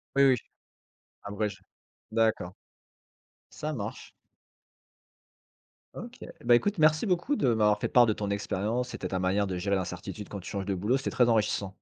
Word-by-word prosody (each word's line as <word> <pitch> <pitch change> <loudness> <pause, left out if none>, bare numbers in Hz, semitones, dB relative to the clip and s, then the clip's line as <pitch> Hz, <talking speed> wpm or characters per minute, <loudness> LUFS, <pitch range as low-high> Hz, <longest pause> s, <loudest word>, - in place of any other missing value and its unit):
Oui, 140 - +5
oui 130 -1 +6
j - - -11 0.8
abrège. 100 -1 -3 0.5
D'accord. 110 -5 +1 1.0
Ça 155 +1 -4
marche. 105 -8 -6 1.8
OK, - - -8
eh - - -9
bah, 120 0 +6
écoute, 205 - +1
merci 155 +4 +4
beaucoup 185 +9 +1
de 205 - +1
m'avoir 105 -1 +3
fait - - -1
part 125 -1 +6
de 110 - +2
ton 105 -1 -4
expérience. 105 +5 -1
C'était - - -5
ta 95 - -1
manière 95 +2 +1
de 95 -1 -3
gérer 100 +2 0
l'incertitude 95 +2 -5
quand 100 - -6
tu 90 - -9
changes 100 -1 -3
de 100 - -1
boulot, 105 +8 +1
c'était 135 - -3
très 125 -1 +3
enrichissant. 105 -3 +1
105 Hz, 175 wpm, -28 LUFS, 100-125 Hz, 1.8 s, oui